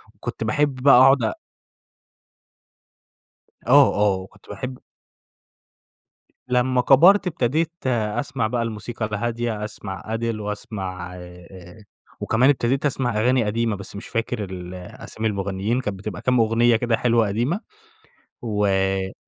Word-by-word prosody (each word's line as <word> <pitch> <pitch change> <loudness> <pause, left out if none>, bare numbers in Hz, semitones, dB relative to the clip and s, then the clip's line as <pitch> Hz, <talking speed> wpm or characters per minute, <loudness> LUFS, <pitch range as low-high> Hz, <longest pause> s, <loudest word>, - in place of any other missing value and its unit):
و - - -32
كنت - - -5
باحب 140 +5 +1
بقى 130 0 +6
أقعد 135 -1 +6
أ 110 - -1 2.3
آه - - +6
آه، 105 -2 +2
وكنت 95 0 -13
باحب 125 +5 -6 1.7
لمَّا 125 0 +2
كبرت 180 +10 +6
ابتديت 155 +2 0 0.2
أسمع 115 +1 -1
بقى 120 +1 -1
الموسيقى 115 0 -4
الهادية 115 0 -3
أسمع 95 -2 -7
Adele 115 -1 -2
وأسمع 95 -4 -6
آآ، 90 +3 -13 0.4
وكمان 125 +5 +2
ابتديت 135 +1 +1
أسمع 125 -5 -1
أغاني 125 +1 +3
قديمة، 115 0 0
بس 100 +1 -10
مش 100 - -8
فاكر 115 -2 -2
ال 90 -1 -7
أسامي 90 +4 -6
المغنيين 100 +4 -2
كانت 105 -4 -4
بتبقى 100 -2 -6
كام 125 -1 +2
أغنية 115 +1 +3
كده 115 0 +1
حلوة 115 -3 +2
قديمة، 120 - -1 0.8
و 95 -3 0
110 Hz, 125 wpm, -22 LUFS, 100-125 Hz, 2.3 s, بقى